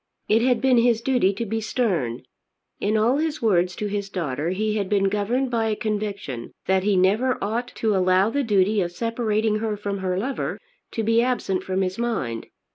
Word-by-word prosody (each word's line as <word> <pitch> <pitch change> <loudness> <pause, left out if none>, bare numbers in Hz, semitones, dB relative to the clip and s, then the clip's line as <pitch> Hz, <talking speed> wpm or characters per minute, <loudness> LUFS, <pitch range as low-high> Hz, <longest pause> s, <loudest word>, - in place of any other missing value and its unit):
It 220 +2 +4
had 250 0 +2
been 260 -2 +4
his 235 -1 +3
duty 240 -5 +2
to 230 +4 -3
be 225 +1 -2
stern. 185 - -1 0.6
In 215 +2 +1
all 235 +5 +3
his 310 0 -1
words 180 -5 +2
to 210 - -3
his 200 -1 -3
daughter 160 -5 -2
he 215 +3 -1
had 200 -2 -2
been 195 -1 +2
governed 235 +6 0
by 225 -2 +1
a 215 - 0
conviction 205 - -4
that 190 0 +2
he 200 +1 +2
never 215 +8 +2
ought 230 +4 -2
to 220 -2 +1
allow 185 +3 +3
the 285 - 0
duty 205 -3 +2
of 175 -1 -2
separating 220 +1 0
her 215 -1 -2
from 200 -1 -3
her 185 -1 -1
lover 255 +7 -3 0.3
to 225 - -1
be 225 +2 +3
absent 240 -7 0
from 190 0 -1
his 185 +3 -3
mind. 165 - -2
210 Hz, 200 wpm, -24 LUFS, 190-230 Hz, 0.6 s, It